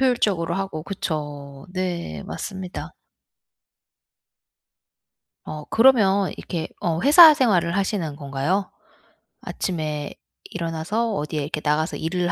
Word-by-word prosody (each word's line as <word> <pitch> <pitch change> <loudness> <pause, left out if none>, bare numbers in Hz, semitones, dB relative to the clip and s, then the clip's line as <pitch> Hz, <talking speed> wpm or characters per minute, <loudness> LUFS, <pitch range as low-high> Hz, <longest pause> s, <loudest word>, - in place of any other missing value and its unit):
효율적으로 205 -10 +1
하고 190 -5 -3
그쵸. 145 -7 -5
네 175 - -3
맞습니다. 190 -2 -6 2.5
어 150 -1 -7
그러면 205 -6 +4
이렇게 165 -2 -4
어 165 -1 -1
회사 315 +3 +9
생활을 185 - +2
하시는 190 -6 -1
건가요? 145 +7 -2 0.7
아침에 155 -5 -3 0.3
일어나서 170 +8 -2
어디에 150 -2 -3
이렇게 150 +2 -3
나가서 155 +1 0
일을 175 +2 -1
170 Hz, 250 characters per minute, -23 LUFS, 155-195 Hz, 2.5 s, 회사